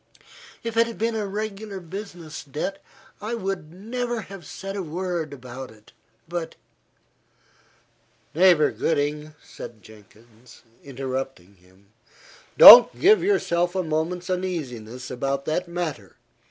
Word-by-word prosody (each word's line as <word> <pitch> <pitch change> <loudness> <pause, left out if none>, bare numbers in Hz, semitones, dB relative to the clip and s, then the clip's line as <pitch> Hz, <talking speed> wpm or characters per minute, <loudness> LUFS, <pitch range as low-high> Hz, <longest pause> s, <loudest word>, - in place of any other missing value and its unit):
If 230 -1 -5
it 230 0 +4
had 230 - -8
been 230 +1 -1
a 215 -2 -2
regular 205 0 -5
business 175 -3 -8
debt, 155 +8 -5 0.4
I 220 +3 -3
would 190 -7 -4
never 235 +5 -4
have 195 -5 -11
said 195 +1 -7
a 200 - -3
word 170 -2 -4
about 130 -1 -9
it, 110 -1 -19 0.4
but" 170 -1 -5 1.8
"Neighbour 170 -2 +5
Gooding," 150 0 -2
said 110 -3 -11
Jenkins, 110 +2 -18 0.2
interrupting 130 -7 -6
him, 95 +2 -26 0.7
"don't 240 0 +11
give 415 +4 +5
yourself 175 - +1
a 185 - 0
moment's 165 +3 -2
uneasiness 130 -10 -5
about 135 +2 -2
that 175 +3 -2
matter. 160 - -5
170 Hz, 120 wpm, -24 LUFS, 135-195 Hz, 1.8 s, don't